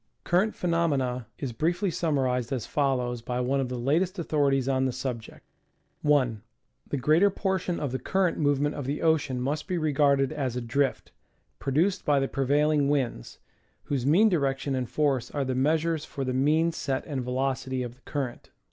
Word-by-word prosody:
Current 190 +5 +1
phenomena 140 -9 0
is 135 -4 -4
briefly 175 - 0
summarized 130 -8 0
as 130 -5 -2
follows 125 -4 0
by 125 +1 -3
one 130 +2 +1
of 130 -2 -1
the 125 - -3
latest 165 +10 +1
authorities 140 -5 +1
on 130 -1 +1
the 130 - +1
subject: 120 -3 -6 0.6
1. 130 -8 +2 0.5
The 145 - -2
greater 155 +9 +4
portion 190 -3 -1
of 145 -4 -2
the 130 - -2
current 190 -3 0
movement 145 0 +1
of 140 -3 -5
the 145 +2 -2
ocean 150 -5 +2
must 140 +6 -2
be 185 -2 -1
regarded 140 -3 +2
as 130 -4 -2
a 125 - -2
drift, 135 +3 -1 0.5
produced 165 +8 +1
by 145 -2 +3
the 135 - 0
prevailing 145 +2 +2
winds, 130 - -2 0.5
whose 140 -4 -2
mean 170 - +5
direction 140 -6 0
and 130 -2 -2
force 140 -5 0
are 140 -2 -2
the 130 - -1
measures 155 +4 +1
for 140 - -5
the 130 - -1
mean 155 +6 +2
set 140 -5 -3
and 140 -4 -3
velocity 130 0 -1
of 120 -1 -6
the 125 - -25
current. 135 -4 -5
140 Hz, 175 wpm, -27 LUFS, 130-155 Hz, 0.6 s, mean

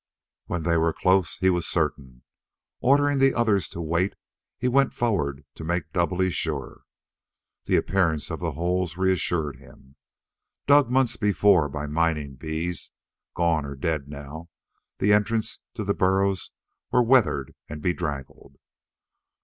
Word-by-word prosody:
When 85 -2 -3
they 85 0 +2
were 80 0 +2
close, 95 -1 +2
he 95 0 +3
was 85 -2 0
certain. 70 -6 -2 0.6
Ordering 145 +1 +3
the 135 0 +4
others 110 -6 +1
to 85 - -6
wait, 85 +4 0 0.4
he - - -1
went 135 +2 +2
forward 75 - -1
to 80 - -9
make 85 -1 -2
doubly 90 +1 +1
sure. 70 -6 -4 0.8
The - - +2
appearance 85 -6 +1
of - - -4
the - - -3
holes 90 +2 -1
reassured 85 -6 0
him. 65 +1 -19 0.7
Dug 145 -3 +5
months 125 -2 +2
before 100 -6 +3
by 75 +1 -4
mining 75 -2 -1
bees, 80 +5 -4 0.5
gone 85 -3 +1
or 70 0 -6
dead 70 0 -2
now, 75 +4 -9 0.5
the 105 +1 +3
entrances 105 +2 0 0.2
to 110 - -3
the 100 0 0
burrows 95 0 +1 0.4
were 125 - +3
weathered 120 -3 +2 0.2
and 75 - -6
bedraggled. 75 -6 -4
85 Hz, 140 wpm, -25 LUFS, 75-100 Hz, 0.8 s, Dug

